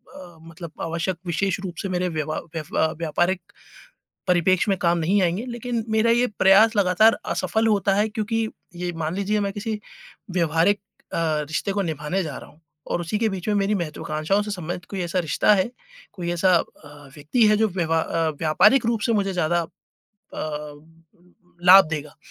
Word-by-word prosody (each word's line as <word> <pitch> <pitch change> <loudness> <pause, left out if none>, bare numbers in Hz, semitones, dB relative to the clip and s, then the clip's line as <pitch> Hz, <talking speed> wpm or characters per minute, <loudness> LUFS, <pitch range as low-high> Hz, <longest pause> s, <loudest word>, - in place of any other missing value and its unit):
अ, 175 -3 -12
मतलब 165 -1 -9
आवश्यक 170 +2 -2
विशेष 185 +2 -1
रूप 180 -2 -5
से 195 - -4
मेरे 180 0 -1
व्यवा 155 -1 -3 0.2
व्यवा 160 0 0
व्यापारिक 175 +3 0 0.9
परिप्रेक्ष्य 180 +3 +3
में 195 - +1
काम 170 0 +2
नहीं 185 +5 +2
आएँगे। 180 +5 0
लेकिन 240 -1 -3
मेरा 220 +1 +3
ये 240 +2 +3
प्रयास 210 +4 +6
लगातार 200 +3 +4 0.2
असफल 185 +6 0
होता 205 -2 +2
है 210 +2 +2
क्योंकि 220 0 -2 0.3
ये 175 0 -3
मान 160 +1 -3
लीजिए 205 +2 0
मैं 200 -1 -1
किसी 210 +1 -4 0.5
व्यवहारिक 175 +3 +2 0.3
अ, - - -1 0.3
रिश्ते 160 +5 -2
को 200 0 0
निभाने 160 +2 -2
जा 155 -5 -5
रहा - - -13
हूँ, 155 - -24 0.3
और - - -2
उसी 175 +5 -2
के 225 - +1
बीच 190 -1 -5
में 210 - +2
मेरी 200 +1 +1
महत्त्वाकांक्षाओं 160 +2 -1
से 210 - -6
संबंधित 175 -2 -5
कोई 195 - -4
ऐसा 175 +1 -2
रिश्ता 165 +5 +2
है, 195 +3 0 0.4
कोई 175 -3 -4
ऐसा 180 +2 +3
अ, 145 -3 -6
व्यक्ति 155 - +2
है 210 - +4
जो 220 0 +2
व्यवा 165 -3 0
अ, 165 0 -1
व्यापारिक 210 +10 +4
रूप 230 -2 0
से 230 - +1
मुझे 200 -2 0
ज़्यादा 175 -1 +1
अ, - - -7 2.0
लाभ 190 +1 +9
देगा। 150 -2 -5
185 Hz, 180 wpm, -23 LUFS, 165-210 Hz, 2.0 s, लाभ